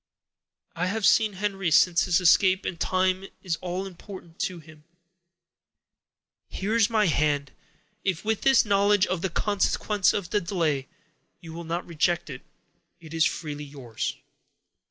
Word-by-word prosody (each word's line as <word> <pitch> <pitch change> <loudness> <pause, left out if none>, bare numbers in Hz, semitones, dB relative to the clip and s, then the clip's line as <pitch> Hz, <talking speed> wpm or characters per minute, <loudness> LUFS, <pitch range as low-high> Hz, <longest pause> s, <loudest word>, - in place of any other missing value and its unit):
I 175 +2 -1
have 210 +2 -1
seen 220 -2 +4
Henry 195 -2 -2
since 175 +1 +4
his 180 -1 +2
escape, 185 +2 +4
and 170 - -4
time 185 +1 0 0.2
is 170 -4 -2
all 180 +1 -4
important 185 -2 -11
to 185 - -2
him. 155 -1 -15 1.6
Here 205 +4 -3
is 225 -2 +4
my 220 -2 +2
hand; 145 -4 0 0.5
if, 190 0 -2
with 220 -1 0
this 270 -2 +4
knowledge 200 -1 +3
of 185 -2 -3
the 190 - -1
consequences 205 +1 +1
of 185 -4 -4
delay, 170 -9 -1 0.5
you 165 -1 -11
will 170 +1 -7
not 170 +2 -3
reject 170 -1 -1
it, 130 - -8 0.6
it 165 -1 -12
is 165 -1 +3
freely 150 -2 -5
yours." 135 -6 -5
180 Hz, 145 wpm, -26 LUFS, 165-195 Hz, 1.6 s, seen